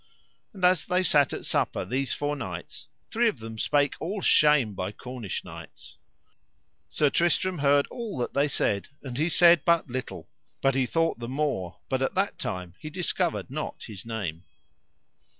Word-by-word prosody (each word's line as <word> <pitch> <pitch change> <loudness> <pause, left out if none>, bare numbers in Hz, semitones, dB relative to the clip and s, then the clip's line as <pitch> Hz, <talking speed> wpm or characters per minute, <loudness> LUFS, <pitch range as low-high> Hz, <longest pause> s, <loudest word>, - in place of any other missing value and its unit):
And 190 -3 -1
as 180 -1 +4
they 180 +1 +2
sat 145 -5 +4
at - - -5
supper - - 0
these 130 +2 -1
four 145 0 -1
knights, 95 - -7 0.2
three 235 +1 +3
of 180 - -5
them 110 -1 -8
spake 145 +2 +2
all 195 +6 -3
shame 150 - +4
by 95 +1 -3
Cornish 120 -3 -6
knights. - - -12 0.9
Sir 150 -2 +2
Tristram 175 +1 +1
heard 140 0 +4
all 230 - -5
that 125 - -2
they 140 +1 +3
said 100 -7 0 0.2
and 130 -3 -6
he 160 +3 +2
said 170 -2 +6
but 170 -6 +2
little, 130 +1 -5 0.3
but 135 - +2
he 130 -1 +1
thought 165 -3 0
the 120 - -5
more, 130 - -2
but 130 -1 -1
at 135 - 0
that 195 +2 0
time 90 -2 -4
he 155 - -7
discovered 175 -3 -1
not 155 +2 -5
his 105 -4 -8
name. 100 -8 -4
140 Hz, 170 wpm, -27 LUFS, 115-170 Hz, 0.9 s, said